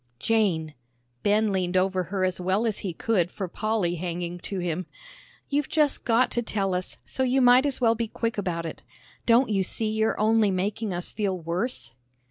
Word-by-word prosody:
"Jane," 165 - +1 0.5
Ben 210 +1 +2
leaned 185 -1 0
over 185 -1 +1
her 190 +1 -2
as 185 -1 0
well 190 +5 +1
as 220 -3 -1
he 190 - -3
could 180 0 0
for 190 0 -5
Polly 205 -2 -1
hanging 175 0 -4
to 195 - -5
him, 175 0 -2 0.6
"you've 290 0 -1
just 300 -2 +1
got 240 +1 +3
to 240 - 0
tell 195 -4 -1
us, 180 0 -3
so - - -3
you 260 +1 +3
might 250 +2 +6
as 275 - -2
well 230 -2 +4
be 230 0 -2
quick 230 +1 -2
about 170 -4 -2
it. 160 - -6 0.5
Don't 240 +2 +5
you 200 -2 +2
see 215 +3 -1
you're 220 0 0
only 215 0 +4
making 200 +3 -1
us 175 0 -2
feel 200 -3 -1
worse?" 170 - -3
200 Hz, 190 wpm, -26 LUFS, 180-225 Hz, 0.6 s, might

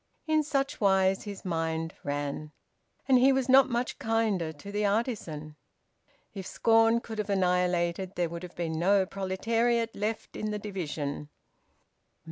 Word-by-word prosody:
In 310 -1 +3
such 275 -4 -1
wise 190 -1 +3
his 200 -2 -8
mind 165 -2 -2
ran. 145 +1 -3 0.6
And 260 -2 +6
he 265 +2 +6
was 265 -1 +1
not 265 +1 +6
much 240 +1 -2
kinder 220 -7 0
to 160 +6 -10
the 205 +1 -1
artisan. 200 - -2 0.8
If 195 -3 -6
scorn 225 0 +3
could 220 -2 -7
have 210 - -2
annihilated, 180 -1 +1
there 175 -1 +1
would 170 +1 -7
have 180 -1 -9
been 160 -2 -2
no 195 +2 +4
proletariat 225 +5 0
left 215 +2 -3
in 215 - -3
the 210 - -2
division... 155 -8 -4
195 Hz, 145 wpm, -29 LUFS, 170-225 Hz, 0.8 s, And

